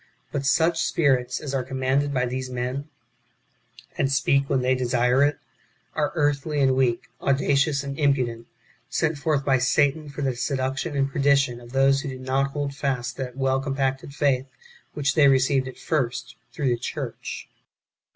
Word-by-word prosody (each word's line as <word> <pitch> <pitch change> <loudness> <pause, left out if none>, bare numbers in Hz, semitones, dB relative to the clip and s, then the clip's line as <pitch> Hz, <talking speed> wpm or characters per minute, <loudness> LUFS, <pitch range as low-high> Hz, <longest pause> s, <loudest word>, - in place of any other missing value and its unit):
But 140 -1 -2
such 165 +2 +3
spirits 130 -5 +1
as 140 -3 -5
are 135 - +1
commanded 130 +2 0
by 125 -2 +1
these 130 +1 -4
men, 125 +4 -3 1.1
and 135 - +2
speak 140 0 +2
when 130 -2 +1
they 130 +1 +3
desire 125 0 +2
it, 145 0 +2 0.6
are 150 -1 0
earthly 145 -1 0
and 135 -1 +3
weak, 125 -3 +1 0.2
audacious 140 +1 +2
and 140 +1 -6
impudent, 125 -5 +1 0.4
sent 155 +1 0
forth 145 -2 0
by 135 -2 +3
Satan 145 +3 +2
for 145 +1 -5
the 135 - +1
seduc 130 +1 -2
tion 160 -1 -3
and 135 0 +1
perdition 140 -3 +2
of 120 0 -13
those 135 +1 +3
who 140 - -5
do 130 - -6
not 130 +1 0
hold 140 0 -3
fast 135 -3 -2
that 130 -1 -5
well 135 0 +1
compacted 135 0 -2
faith 135 -2 +1 0.5
which 140 -2 +1
they 150 -3 +5
received 135 0 +3
at 130 - -9
first 130 -5 -2 0.2
through 145 -5 -1
the 120 - +1
church. - - -5
135 Hz, 170 wpm, -24 LUFS, 130-140 Hz, 1.1 s, they